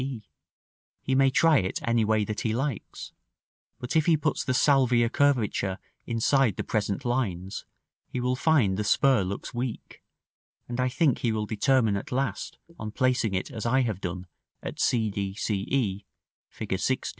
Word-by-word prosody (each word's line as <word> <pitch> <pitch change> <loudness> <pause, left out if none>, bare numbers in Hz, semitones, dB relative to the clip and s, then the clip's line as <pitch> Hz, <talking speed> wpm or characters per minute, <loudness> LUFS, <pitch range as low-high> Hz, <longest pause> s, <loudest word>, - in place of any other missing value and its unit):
He 130 - -1
may 135 0 +5
try 155 +3 +4
it 95 - -2
any 115 -1 +3
way 110 -1 +2
that 105 +1 -4
he 110 -1 -1
likes; 135 -2 -4 0.7
but 125 - -5
if 155 0 +3
he 165 -2 +5
puts 155 +1 -1
the 130 - -1
salvia 125 -4 +3
curvature 115 -9 +1 0.3
inside 115 -1 +2
the - - -3
present 105 +4 -2
lines, 100 -7 -2 0.4
he 125 - -4
will 125 +1 0
find 130 -10 +2
the 105 - -1
spur 130 +3 +3
looks 95 +6 -5
weak, 120 -1 -5 0.7
and 120 +1 -5
I 130 0 +2
think 140 0 +1
he 120 - 0
will 110 -1 -1
determine 110 0 +2
at - - -7
last 135 +2 -2 0.2
on 110 - -4
placing 125 -3 +1
it 95 - -3
as 115 -2 -4
I 130 +3 +3
have 110 -6 -2
done 90 0 -4 0.4
at - - -6
c 110 -3 +1
d, 100 -1 -3
c 100 -2 -2
e, 105 -7 -1 0.4
Fig. - - -4
120 Hz, 170 wpm, -27 LUFS, 105-130 Hz, 0.7 s, may